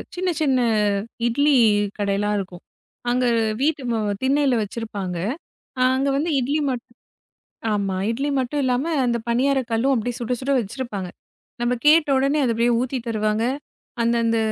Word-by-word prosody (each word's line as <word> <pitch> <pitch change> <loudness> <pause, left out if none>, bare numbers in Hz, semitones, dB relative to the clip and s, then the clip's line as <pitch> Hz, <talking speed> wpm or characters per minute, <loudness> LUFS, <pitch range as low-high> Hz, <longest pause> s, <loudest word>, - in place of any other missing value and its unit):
சின்ன, 365 0 -1
சின்ன 265 -4 +3 0.7
இட்லி 285 +4 +3 0.4
கடையெல்லாம் 205 +1 0
இருக்கும். 180 -2 -8 0.5
அங்க 250 +1 +1 0.4
வீட்டு 295 -1 +1
மு 230 - 0 0.2
திண்ணையில 275 -1 +3
வச்சிருப்பாங்க. 200 -4 -5 0.6
ஆ, - - +1
அங்க 270 +1 +1
வந்து 320 +3 0
இட்லி 285 +5 0
மட்டு 250 0 -5 0.9
ஆமா, 200 -2 -1 0.2
இட்லி 275 +5 -2
மட்டும் 285 +3 -2
இல்லாம 255 +5 0 0.2
அந்த 240 -1 +1
பணியாரக் 260 +1 +1
கல்லும் 255 +5 +2
அப்படியே 240 +1 -2
சுடச் 245 +1 -2
சுட 275 - -2
வச்சிருப்பாங்க. 205 -4 -5 0.5
நம்ம 240 +1 +1
கேட்ட 305 0 +6
உடனே, 275 +3 +1
அது 235 - +2
அப்படியே 235 +1 +2
ஊத்தித் 250 -1 -3
தருவாங்க. 215 0 0 0.6
அந்த 235 +1 +2
அந்த 230 0 +2
245 Hz, 145 wpm, -22 LUFS, 225-275 Hz, 0.9 s, கேட்ட